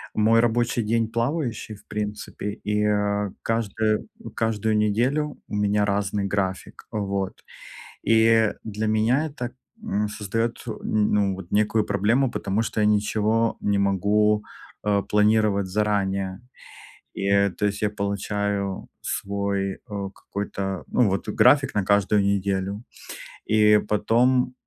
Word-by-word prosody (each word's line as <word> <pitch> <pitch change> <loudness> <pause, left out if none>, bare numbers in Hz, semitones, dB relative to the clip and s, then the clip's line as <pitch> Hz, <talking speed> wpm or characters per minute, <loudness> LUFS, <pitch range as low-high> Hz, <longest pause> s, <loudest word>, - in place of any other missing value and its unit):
Мой 110 +2 +4
рабочий 120 0 +1
день 115 +1 +1
плавающий, 115 -2 -2
в - - -19
принципе, 105 0 -5 0.2
и, 105 0 +1
э, 105 -1 0
каждую, 110 -1 0 0.2
м, - - -8
каждую 110 -1 0
неделю 125 +8 +1
у - - -5
меня 105 0 +2
разный 100 0 -1
график. 95 -2 -3
Вот. 100 -2 -2 0.7
И 115 -1 +5
для 110 0 -3
меня 115 +8 +2
это, 125 -4 -5 0.3
м, 105 +1 -1
создает, 115 +3 -2
н 115 - -3 0.4
ну 100 -2 +2
вот 95 -2 -10
некую 105 +1 +2
проблему, 115 +6 +1
потому 100 +3 -1
что 110 - -3
я 105 - +4
ничего 105 +2 +1
не 100 -1 +1
могу, 105 +2 +2 0.4
э, 100 -1 +1
планировать 105 -1 +2
заранее. 100 -1 -1 0.8
И, 100 0 +3
то - - 0
есть 105 +1 -3
я 105 - +2
получаю 100 -1 -2
свой, 100 -1 -2
э, 100 -2 -6
какой-то, 95 -2 -4
ну 120 -5 +2
вот 95 +1 -2
график 140 -1 +4
на 105 - +2
каждую 100 +1 +3
неделю. 100 +1 -1 0.7
И 105 -1 +6
потом, 120 +5 +2
105 Hz, 130 wpm, -24 LUFS, 100-110 Hz, 0.8 s, И